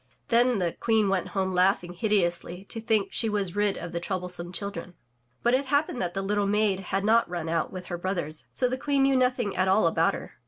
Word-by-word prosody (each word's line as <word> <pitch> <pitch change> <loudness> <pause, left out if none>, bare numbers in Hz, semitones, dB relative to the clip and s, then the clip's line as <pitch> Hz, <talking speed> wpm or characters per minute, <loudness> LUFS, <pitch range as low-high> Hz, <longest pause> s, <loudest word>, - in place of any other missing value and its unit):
Then 240 0 +4
the 175 -3 0
Queen 220 0 +1
went 195 -1 0
home 190 -1 -1
laughing 180 -1 +2
hideously 180 -2 -1
to 225 - -6
think 220 -3 +1
she 225 - +1
was 200 -3 -2
rid 205 -1 +1
of 170 - -6
the 170 - -3
troublesome 180 -1 -4
children. 200 -2 -5 0.5
But 240 - +3
it 265 +1 +1
happened 285 -2 0
that 175 -1 -3
the 195 - -1
little 205 0 0
maid 205 -1 +2
had 195 +1 -2
not 230 0 +3
mn 175 -2 -4
out 165 0 -1
with 185 -1 -7
her 175 -1 -5
brothers, 170 -4 -1
so 250 - +1
the 255 +1 -3
Queen 280 -1 +1
knew 270 0 +3
nothing 250 -5 +1
at 185 +1 +1
all 195 +3 +4
about - - +2
her. - - -10
195 Hz, 225 wpm, -27 LUFS, 180-225 Hz, 0.5 s, Then